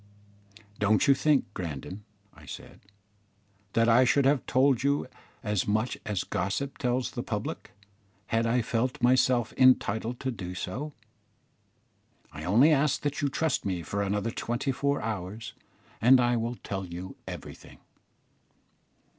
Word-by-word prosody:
"Don't 105 Hz, 0 st, +3 dB
you 140 Hz, -, +7 dB
think, 140 Hz, 0 st, +2 dB
Grandon," 90 Hz, +4 st, -6 dB, 0.3 s
I 75 Hz, -3 st, -16 dB
said, -, -, -10 dB, 0.9 s
"that 115 Hz, 0 st, +3 dB
I 120 Hz, +2 st, +6 dB
should 130 Hz, +2 st, +3 dB
have 140 Hz, -1 st, +3 dB
told 130 Hz, -1 st, +3 dB
you 140 Hz, +1 st, +1 dB, 0.4 s
as 105 Hz, -4 st, 0 dB
much 110 Hz, +4 st, 0 dB
as 105 Hz, -4 st, -1 dB
gossip 135 Hz, +9 st, -3 dB
tells 125 Hz, 0 st, 0 dB
the -, -, -4 dB
public, -, -, -5 dB, 0.5 s
had 115 Hz, +1 st, 0 dB
I 120 Hz, +1 st, +2 dB
felt 120 Hz, +3 st, -1 dB
myself 125 Hz, -2 st, +3 dB
entitled 125 Hz, -2 st, +3 dB
to 130 Hz, -, -1 dB
do 90 Hz, -5 st, -6 dB
so? 135 Hz, +12 st, -5 dB, 1.4 s
I -, -, -8 dB
only 120 Hz, -, +5 dB
ask 150 Hz, -1 st, +2 dB
you 145 Hz, -, +2 dB
to 145 Hz, 0 st, -1 dB
trust 160 Hz, +2 st, 0 dB
me 90 Hz, -3 st, -2 dB
for 100 Hz, +4 st, -3 dB
another 100 Hz, +2 st, -1 dB
twenty 120 Hz, +5 st, -2 dB
four 140 Hz, +2 st, -1 dB
hours, 105 Hz, 0 st, -5 dB, 0.5 s
and 130 Hz, +3 st, +7 dB
I 120 Hz, 0 st, +3 dB
will 120 Hz, +1 st, -2 dB
tell 95 Hz, -4 st, -5 dB
you 90 Hz, +1 st, -7 dB
everything." -, -, -9 dB
120 Hz, 140 wpm, -28 LUFS, 105-130 Hz, 1.4 s, you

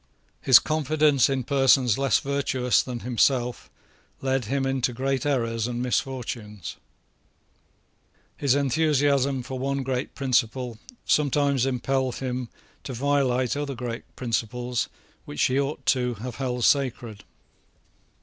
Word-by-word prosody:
His 130 Hz, -2 st, +8 dB
confidence 155 Hz, -3 st, +2 dB
in 135 Hz, -2 st, -1 dB
persons 135 Hz, -3 st, +4 dB
less 135 Hz, -1 st, +2 dB
virtuous 135 Hz, -3 st, +1 dB
than 125 Hz, -3 st, -6 dB
himself 125 Hz, 0 st, 0 dB, 0.5 s
led 130 Hz, -2 st, 0 dB
him 135 Hz, +4 st, -1 dB
into 130 Hz, -2 st, 0 dB
great 135 Hz, +2 st, -1 dB
errors 115 Hz, -5 st, 0 dB
and 120 Hz, -1 st, -3 dB
misfortunes. 120 Hz, -8 st, -3 dB, 1.6 s
His 140 Hz, -2 st, +2 dB
enthusiasm 140 Hz, -2 st, +2 dB
for 130 Hz, +1 st, -6 dB
one 140 Hz, +1 st, -1 dB
great 130 Hz, 0 st, -3 dB
principle 125 Hz, -3 st, 0 dB, 0.3 s
sometimes 140 Hz, -3 st, +2 dB
impelled 130 Hz, 0 st, -1 dB
him 125 Hz, -2 st, -4 dB, 0.3 s
to 135 Hz, -, -6 dB
violate 130 Hz, -1 st, +1 dB
other 145 Hz, -1 st, -3 dB
great 120 Hz, -1 st, -5 dB
principles 120 Hz, 0 st, -2 dB, 0.4 s
which 75 Hz, -, -2 dB
he 130 Hz, +2 st, +2 dB
ought 140 Hz, +2 st, -3 dB
to 125 Hz, -3 st, +1 dB
have 120 Hz, +3 st, -7 dB
held 125 Hz, -3 st, -1 dB
sacred. 120 Hz, -6 st, 0 dB
130 Hz, 120 wpm, -25 LUFS, 120-140 Hz, 1.6 s, His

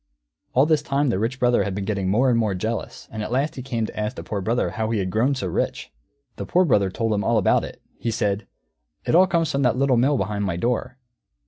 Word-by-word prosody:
All 135 Hz, +3 st, +5 dB
this 155 Hz, -2 st, +2 dB
time 140 Hz, -1 st, 0 dB
the 95 Hz, -, 0 dB
Rich 120 Hz, +4 st, -2 dB
Brother 120 Hz, -3 st, +3 dB
had 95 Hz, -1 st, -3 dB
been 100 Hz, -1 st, -3 dB
getting 100 Hz, -3 st, -1 dB
more 125 Hz, +6 st, +3 dB
and 115 Hz, -, +2 dB
more 105 Hz, -4 st, 0 dB
jealous, 110 Hz, +5 st, -4 dB
and 110 Hz, -, -5 dB
at 105 Hz, -, -4 dB
last 140 Hz, +5 st, 0 dB
he 130 Hz, -, -7 dB
came 120 Hz, -3 st, -2 dB
to -, -, -8 dB
ask 105 Hz, 0 st, -2 dB
the -, -, -7 dB
Poor 100 Hz, -2 st, -3 dB
Brother 115 Hz, +5 st, 0 dB
how 110 Hz, -1 st, -2 dB
he 115 Hz, -, 0 dB
had 95 Hz, -2 st, -1 dB
grown 125 Hz, +8 st, +2 dB
so 115 Hz, -, -3 dB
rich. 90 Hz, -, -2 dB, 0.5 s
The -, -, -4 dB
Poor 185 Hz, +1 st, +3 dB
Brother 100 Hz, -, +3 dB
told 115 Hz, +3 st, -1 dB
him 105 Hz, -1 st, 0 dB
all 115 Hz, +3 st, +2 dB
about 105 Hz, -, +3 dB
it. -, -, -9 dB, 0.2 s
He 115 Hz, -, -2 dB
said, 105 Hz, -1 st, -1 dB, 0.6 s
"It -, -, 0 dB
all 185 Hz, +3 st, +6 dB
comes 165 Hz, -4 st, +1 dB
from 140 Hz, -, 0 dB
that 125 Hz, -2 st, +2 dB
Little 135 Hz, -2 st, +3 dB
Mill 135 Hz, +4 st, +3 dB
behind 105 Hz, -1 st, -2 dB
my 95 Hz, -4 st, -1 dB
door. 120 Hz, +4 st, -1 dB
115 Hz, 255 wpm, -23 LUFS, 105-135 Hz, 0.6 s, all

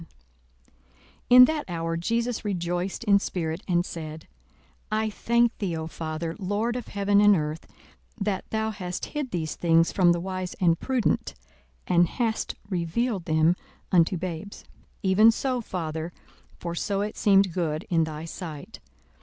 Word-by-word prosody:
42:010:021 165 Hz, -, -14 dB, 1.2 s
In 250 Hz, +1 st, +10 dB
that 305 Hz, +1 st, -2 dB
hour 165 Hz, -1 st, -2 dB
Jesus 230 Hz, +7 st, -1 dB
rejoiced 180 Hz, 0 st, -2 dB
in 200 Hz, -3 st, +5 dB
spirit, 165 Hz, -3 st, -3 dB
and 175 Hz, -1 st, +2 dB
said, 155 Hz, -1 st, -7 dB, 0.6 s
I 215 Hz, 0 st, 0 dB
thank 235 Hz, +2 st, +2 dB
thee, 180 Hz, -5 st, -2 dB
O 160 Hz, -, -4 dB
Father, 160 Hz, +1 st, -4 dB
Lord 210 Hz, +5 st, -1 dB
of 250 Hz, -, -5 dB
heaven 200 Hz, 0 st, +2 dB
and 205 Hz, -1 st, +7 dB
earth, 155 Hz, -1 st, -3 dB, 0.5 s
that 200 Hz, -2 st, -2 dB
thou 220 Hz, 0 st, -1 dB
hast 180 Hz, -4 st, -5 dB
hid 295 Hz, -3 st, -2 dB
these 160 Hz, -6 st, -3 dB
things 165 Hz, -1 st, +3 dB
from 180 Hz, -3 st, +4 dB
the 175 Hz, -, +1 dB
wise 185 Hz, 0 st, -4 dB
and 170 Hz, -3 st, +2 dB
prudent, 260 Hz, -3 st, 0 dB, 0.5 s
and 175 Hz, -1 st, +4 dB
hast 225 Hz, +3 st, -2 dB
revealed 185 Hz, +2 st, -1 dB
them 160 Hz, +2 st, +3 dB, 0.4 s
unto 175 Hz, 0 st, +4 dB
babes: 180 Hz, +2 st, -6 dB, 0.4 s
even 200 Hz, +4 st, +6 dB
so, 250 Hz, +2 st, 0 dB
Father; 160 Hz, -5 st, -4 dB, 0.5 s
for 170 Hz, -1 st, -5 dB
so 195 Hz, +3 st, -1 dB
it 210 Hz, +1 st, -3 dB
seemed 195 Hz, -3 st, +4 dB
good 160 Hz, -3 st, -2 dB
in 165 Hz, -2 st, +3 dB
thy 155 Hz, 0 st, -6 dB
sight. 160 Hz, -3 st, -8 dB
180 Hz, 150 wpm, -26 LUFS, 165-215 Hz, 1.2 s, In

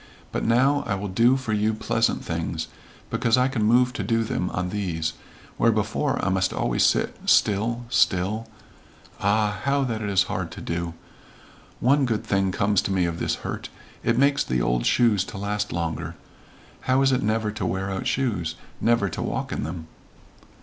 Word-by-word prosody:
But -, -, -2 dB
now 130 Hz, +5 st, +3 dB, 0.2 s
will 100 Hz, -, -5 dB
I -, -, -7 dB
do 120 Hz, +7 st, +4 dB
for 130 Hz, -5 st, -3 dB
you 105 Hz, +1 st, +1 dB
pleasant 110 Hz, +1 st, 0 dB
things, 80 Hz, -1 st, -3 dB, 0.4 s
because 115 Hz, +1 st, +2 dB
I 125 Hz, +1 st, +4 dB
can 130 Hz, -4 st, -2 dB
move 125 Hz, +3 st, +4 dB
to -, -, -3 dB
do 115 Hz, -1 st, +1 dB
them 90 Hz, -4 st, -2 dB
on 90 Hz, 0 st, -2 dB
these, 85 Hz, -6 st, -2 dB, 0.4 s
where 115 Hz, -, +4 dB
before 110 Hz, +6 st, 0 dB
I -, -, +2 dB
must 95 Hz, 0 st, +1 dB
always -, -, +1 dB
sit -, -, +2 dB
still 115 Hz, +4 st, +2 dB
still 105 Hz, +1 st, +1 dB, 0.7 s
Ah, 105 Hz, 0 st, +1 dB
how 140 Hz, 0 st, +2 dB
that 115 Hz, -4 st, -2 dB
is 100 Hz, -2 st, +2 dB
hard 95 Hz, -3 st, -3 dB
to -, -, -8 dB
do! 85 Hz, 0 st, -3 dB, 0.8 s
One 135 Hz, +2 st, +3 dB
good 110 Hz, -3 st, -1 dB
thing 95 Hz, -1 st, +1 dB
comes 100 Hz, +1 st, +2 dB
to -, -, -3 dB
me 95 Hz, -2 st, +2 dB
of 85 Hz, -1 st, -3 dB
this -, -, 0 dB
hurt. -, -, -4 dB, 0.3 s
It 115 Hz, 0 st, +1 dB
makes 140 Hz, +1 st, +3 dB
the 65 Hz, -1 st, -1 dB
old -, -, +1 dB
shoes 110 Hz, -6 st, +3 dB
to -, -, -8 dB
last 105 Hz, +1 st, -2 dB
longer. 85 Hz, -1 st, -3 dB, 0.7 s
How 130 Hz, +1 st, +4 dB
is 135 Hz, -, +4 dB
it 130 Hz, 0 st, +2 dB
never 110 Hz, 0 st, 0 dB
to 110 Hz, -1 st, -5 dB
wear 95 Hz, +1 st, -1 dB
out 95 Hz, -, -3 dB
shoes? 95 Hz, -12 st, -1 dB, 0.3 s
Never 115 Hz, -3 st, +3 dB
to -, -, -5 dB
walk -, -, -3 dB
in -, -, -2 dB
them." 80 Hz, 0 st, -6 dB
105 Hz, 185 wpm, -24 LUFS, 90-120 Hz, 0.8 s, do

